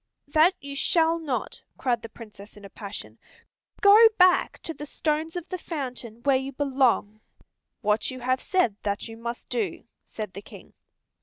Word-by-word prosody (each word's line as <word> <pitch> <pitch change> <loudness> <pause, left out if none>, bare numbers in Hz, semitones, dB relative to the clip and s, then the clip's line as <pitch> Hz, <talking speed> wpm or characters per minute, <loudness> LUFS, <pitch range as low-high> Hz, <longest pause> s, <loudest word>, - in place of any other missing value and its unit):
"That 315 +5 +4
you 280 0 -8
shall 330 +2 +2
not," 290 -6 -4 0.2
cried 240 -3 0
the 230 - -8
Princess 210 -2 -13
in 205 - -12
a 195 - -12
passion. 195 - -8 0.6
"Go 425 +3 +9
back 365 -1 +4
to 325 - -5
the 295 -1 -8
stones 310 +3 -1
of 350 -2 -5
the 370 - -4
fountain, 250 -8 -6
where 275 -2 +4
you 265 +1 -5
belong." 255 -6 +1 0.6
"What 210 -1 +1
you 255 -1 -7
have 255 +1 0
said 305 - +1
that 200 +1 -2
you 225 - -9
must 235 +1 -6
do," 435 -5 -2 0.2
said 210 -4 -7
the 200 - -7
King. - - -14
260 Hz, 170 wpm, -26 LUFS, 220-320 Hz, 0.6 s, Go